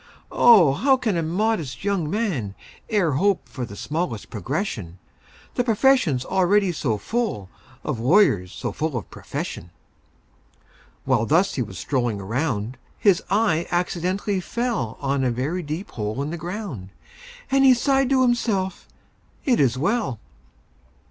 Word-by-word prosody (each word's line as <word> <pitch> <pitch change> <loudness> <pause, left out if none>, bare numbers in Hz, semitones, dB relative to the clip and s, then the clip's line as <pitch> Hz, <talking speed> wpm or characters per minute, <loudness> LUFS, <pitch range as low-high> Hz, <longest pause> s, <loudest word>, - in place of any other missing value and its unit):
"O, 190 - +6
how 265 - +3
can 225 -6 -1
a 170 - +1
modest 170 - -1
young 195 -6 0
man 165 - -2 0.4
E'er 195 -7 +2
hope 190 +8 +1
for 125 - -5
the 100 - -10
smallest 150 - -4
progression,— 105 - -4 0.6
The 245 - +1
profession's 225 - +3
already 190 +1 +2
so 130 -9 -1
full 210 - -2 0.3
Of 135 -7 -3
lawyers 120 - +3
so - - -4
full 155 -3 -2
of 105 - -7
profession!" 85 - -6 1.4
While 120 -4 +2
thus 175 +6 +3
he 130 - -2
was 95 -6 -5
strolling 120 - -1
around, 115 +2 -2 0.2
His 195 -5 +3
eye 190 -5 +2
accidentally 185 +3 -1
fell 225 - -2
On 140 -1 0
a 130 - +2
very 135 +10 -2
deep 160 +5 -5
hole 110 +4 -3
in 150 - -4
the - - -3
ground, 170 - -6 0.6
And 270 0 +4
he 260 -2 +7
sighed 270 +1 +2
to 265 -1 +4
himself, 215 -7 0 0.6
"It 250 -4 +3
is 130 -4 +3
well!" 170 - 0
165 Hz, 140 wpm, -23 LUFS, 125-210 Hz, 1.4 s, he